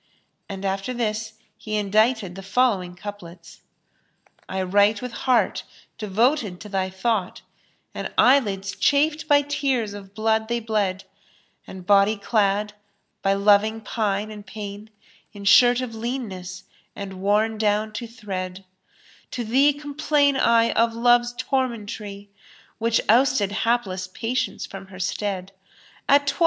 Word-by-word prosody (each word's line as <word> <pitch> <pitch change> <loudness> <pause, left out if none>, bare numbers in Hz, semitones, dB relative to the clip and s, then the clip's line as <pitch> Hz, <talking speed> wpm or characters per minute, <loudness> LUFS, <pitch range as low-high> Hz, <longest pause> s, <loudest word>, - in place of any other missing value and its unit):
And 195 0 -6
after 195 +6 -2
this 220 -1 -2 0.3
he 215 -1 -4
indited 210 -1 +1
the 195 - -8
following 195 -3 +1
couplets, 175 -4 -10 0.9
"I 190 0 -2
write 205 +3 +3
with 250 +1 -6
heart 250 +1 +1 0.4
devoted 215 -1 +1
to 210 - -9
thy 190 -1 -1
thought, 190 0 -2 0.2
* - - -41
And - - -5
eyelids 205 -7 +3
chafed 300 +2 +2
by 290 0 +5
tears 265 -7 -1
of 200 -1 -11
blood 220 0 +1
they 235 +1 -1
bled; 210 -4 -1 0.6
And 185 -1 -10
body 200 +2 +4
clad, 205 0 0 0.5
by 195 0 +2
loving 205 +2 +3
pine 215 -1 -2
and 210 -1 -9
pain, 205 +1 -8 0.2
* - - -32
In 200 -1 -10
shirt 245 +5 +6
of 250 -3 -5
leanness, 215 -6 -5 0.3
and 195 -2 -7
worn 210 +2 +1
down 215 0 +1
to 235 +1 -5
thread, 190 -4 -6 0.6
To 245 - -4
thee 265 +6 +4
complain 290 0 +1
I 230 -3 +3
of 230 0 +1
Love's 240 +1 +3
tormentry, 215 -6 -3 0.2
* - - -27
Which 230 0 +2
ousted 235 -3 +3
hapless 205 -4 -1
Patience 230 +7 -3
from 195 0 -10
her 185 -1 -12
stead: 195 0 -3 0.6
A 280 - +8
toi! 285 -1 -3
215 Hz, 140 wpm, -23 LUFS, 195-240 Hz, 0.9 s, A